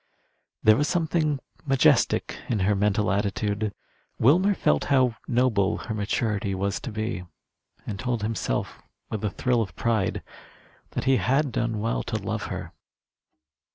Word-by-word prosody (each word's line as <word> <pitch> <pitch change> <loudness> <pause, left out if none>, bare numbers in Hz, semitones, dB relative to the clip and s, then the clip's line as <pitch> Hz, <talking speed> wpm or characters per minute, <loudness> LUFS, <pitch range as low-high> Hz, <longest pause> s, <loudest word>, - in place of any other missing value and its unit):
There 110 0 +6
was 145 +2 +1
something 160 -4 +1 0.2
majestic 135 -3 +3
in 110 -5 0
her 100 +3 +3
mental 105 -1 +1
attitude. 105 +1 -1 0.5
Wilmer 180 - +4
felt 75 - +2
how 130 -4 +3
noble 120 -6 +2
her 115 - -5
maturity 105 -1 -1
was 100 +2 -1
to 130 - -6
be, 110 -3 -3 0.6
and 100 -3 -5
told 120 -4 -1
himself, 110 0 -2 0.3
with 110 -2 -3
a 105 - +1
thrill 125 +1 +1
of 105 - -4
pride, 115 -5 0 0.7
that - - -2
he 135 -1 +4
had 135 +2 +1
done 115 -1 -1
well 115 +1 0
to - - -4
love - - -3
her. - - -6
110 Hz, 145 wpm, -26 LUFS, 105-130 Hz, 0.7 s, There